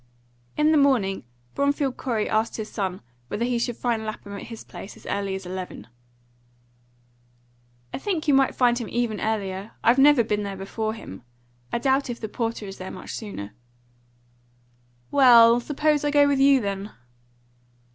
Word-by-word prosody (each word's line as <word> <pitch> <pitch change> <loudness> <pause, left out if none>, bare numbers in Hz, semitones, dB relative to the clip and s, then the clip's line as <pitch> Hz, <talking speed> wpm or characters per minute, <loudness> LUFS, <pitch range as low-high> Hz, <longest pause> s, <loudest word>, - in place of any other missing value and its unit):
In 300 +1 +4
the 310 - +5
morning 220 - +2 0.3
Bromfield 280 -1 0
Corey 225 -5 -2
asked 220 +1 0
his 220 -1 -6
son 190 -3 -3 0.3
whether 230 - -2
he 245 -1 0
should 240 0 -2
find 235 -3 -1
Lapham 215 -2 -7
at 200 - -7
his 230 -2 -9
place 195 - -10
as - - -18
early 200 -1 -2
as 190 -1 -7
eleven. 185 0 -6 2.1
"I - - -3
think 335 -2 -2
you 290 - +4
might 270 -1 +3
find 240 -1 +3
him 230 - -5
even 235 -3 -1
earlier. 200 -2 -3
I've 240 +3 +4
never 280 -3 +6
been 210 -1 -1
there 200 -1 -5
before 215 +3 -3
him. 95 - -10 0.5
I - - 0
doubt 265 +2 +1
if 235 - -5
the 220 - -4
porter 225 0 -3
is 195 -1 -9
there 185 - -6
much - - -8
sooner." 150 - -7 1.6
"Well, 240 -4 +7
suppose 295 +3 0
I 295 - +1
go 290 0 +5
with 280 -1 +1
you, 275 -1 +5
then?" 200 0 -3
230 Hz, 165 wpm, -24 LUFS, 200-270 Hz, 2.1 s, Well